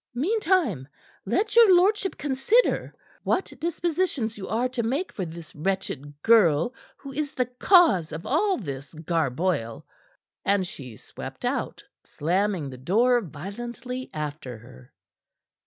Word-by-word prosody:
"Meantime, 325 - +1 0.4
let 425 +1 0
your 450 -6 +8
lordship 385 +2 +2
consider 290 - +2 0.3
what 380 - -1
dispositions 330 -7 -1
you 195 -2 -7
are 235 +3 0
to 255 -1 -3
make 270 +11 -1
for 190 - -4
this 165 0 -10
wretched 150 -4 -3
girl 200 - +4 0.2
who 275 -1 -10
is 290 0 -3
the 250 - +1
cause 250 - +4
of 160 +2 -6
all 380 +7 +2
this 140 - -7
garboil." 155 -5 -1 0.6
And 200 -1 +2
she 125 -10 -9
swept - - -9
out, - - -2 0.2
slamming 180 -2 -1
the 130 - -10
door 235 - +3
violently 240 - -7
after 150 -5 -5
her. 65 - -16
215 Hz, 125 wpm, -25 LUFS, -, 0.6 s, your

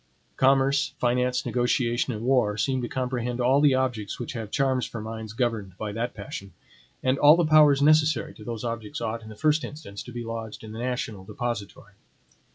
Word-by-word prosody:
Commerce, 135 +1 +3
finance, 125 +1 +1
negotiation, 120 0 +1
and 110 -1 -5
war 125 -6 +2
seem 130 +2 0
to 120 - -3
comprehend 125 -1 -2
all 130 +3 +4
the 145 -3 +5
objects 125 -6 -2
which 120 - -5
have 110 -4 -5
charms 130 0 +1
for 115 - -7
minds 110 0 -6
governed 115 -6 -2
by 105 -1 -4
that 115 +4 -3
passion; 100 -2 -8 0.5
and 130 +1 +2
all 150 +2 +8
the 175 -1 +2
powers 150 -2 +6
necessary 155 -2 +3
to 105 - -13
those 115 0 -5
objects 115 -3 -4
ought, 115 0 -3
in 110 - -11
the 110 - -10
first 155 +5 +2
instance, 145 -10 -8
to 125 - -10
be 120 0 -5
lodged 115 -1 -6
in 110 - -8
the 110 - -7
national 120 -5 -3
depository. 105 0 -5
120 Hz, 190 wpm, -26 LUFS, 110-135 Hz, 0.5 s, all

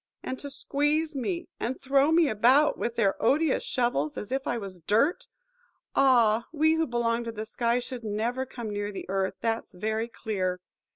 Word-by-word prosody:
And 260 - -4
to 285 - -7
squeeze 295 +3 0
me, 340 +7 -2
and 250 +3 -3
throw 275 +3 +3
me 330 -1 +5
about 260 +7 +4
with 235 - -3
their 200 -5 +1
odious 290 +5 +3
shovels, 240 - -1
as 210 - -6
if 270 0 -2
I 240 - 0
was 195 -4 -7
dirt! 225 - +1 0.7
Ah! 235 -4 +4
we 315 0 +3
who 320 0 +1
belong 235 -1 0
to 230 - -3
the 215 -1 -5
sky 235 +2 0
should 250 -1 -5
never 225 +5 -1
come 235 -4 -6
near 205 0 -3
the 195 - -7
earth, 190 0 -1
that's 225 -4 -2
very 220 +4 -1
clear. 190 -6 -3
235 Hz, 180 wpm, -27 LUFS, 215-275 Hz, 0.7 s, me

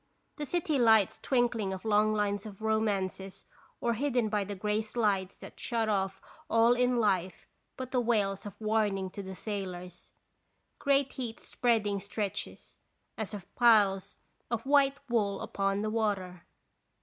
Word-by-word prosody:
The 295 -1 -4
city 315 -3 0
lights 220 -5 +4
twinkling 240 -6 +1
of 190 +2 -7
long 215 0 +3
lines 205 -1 -1
of 210 0 -11
romances 200 -3 -1 0.3
or 235 - +1
hidden 245 -2 0
by 210 -1 0
the 200 +1 -5
gray 210 +2 0
slides 210 -4 -1
that - - -12
shut 230 -3 -1
off 195 -2 0 0.3
all 230 +1 +5
in 250 0 +2
life 190 -5 0 0.3
but 255 -1 -6
the 250 - +2
wails 210 -4 0
of 205 0 -11
warning 210 -3 0
to 200 - -6
the 190 -1 -7
sailors. 180 -4 -6 0.7
Great 280 -1 +2
heat 240 -4 -5
spreading 215 -5 0
stretches, 200 0 -5 0.4
as 215 -1 -4
of 195 - -11
piles 205 -5 +4 0.3
of 235 0 -2
white 275 0 +4
wool 210 -5 0
upon 195 +1 -1
the 215 - -1
water. 195 -5 -2
215 Hz, 150 wpm, -30 LUFS, 195-235 Hz, 0.7 s, all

